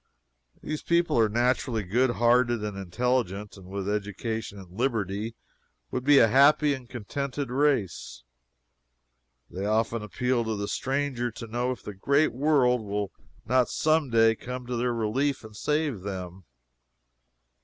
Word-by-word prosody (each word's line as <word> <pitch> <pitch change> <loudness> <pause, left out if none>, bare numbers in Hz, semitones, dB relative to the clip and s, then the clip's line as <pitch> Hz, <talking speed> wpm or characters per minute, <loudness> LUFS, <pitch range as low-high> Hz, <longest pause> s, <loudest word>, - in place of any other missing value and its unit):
These 155 0 -4
people 170 -5 +2
are 110 -1 +4
naturally 120 0 +1
good 120 +8 +2
hearted 120 -1 +2
and 105 -2 -4
intelligent, 105 +1 -1
and 95 -2 -13
with 100 0 -4
education 105 +1 -3
and 95 -3 -12
liberty, 110 -3 -1 0.6
would 125 - -2
be 145 +1 +6
a 115 - +7
happy 145 +4 +5
and 130 -3 -8
contented 135 +3 -4
race. 125 - 0 1.3
They 95 - -5
often 110 +1 +1
appeal 120 +5 -1
to 110 -1 -1
the 100 0 -3
stranger 135 -2 -1
to 115 +1 -8
know 120 +3 -2
if 130 - -7
the 105 - -6
great 140 +10 +2
world 130 -3 +3
will 100 -1 -3 0.3
not 125 +1 +2
some 155 -2 +1
day 115 -1 +5
come 125 +2 -7
to 125 0 -3
their 120 +1 0
relief 120 +5 -1
and 110 -1 -12
save 150 -5 -1
them. 95 -2 -6
120 Hz, 145 wpm, -27 LUFS, 105-130 Hz, 1.3 s, a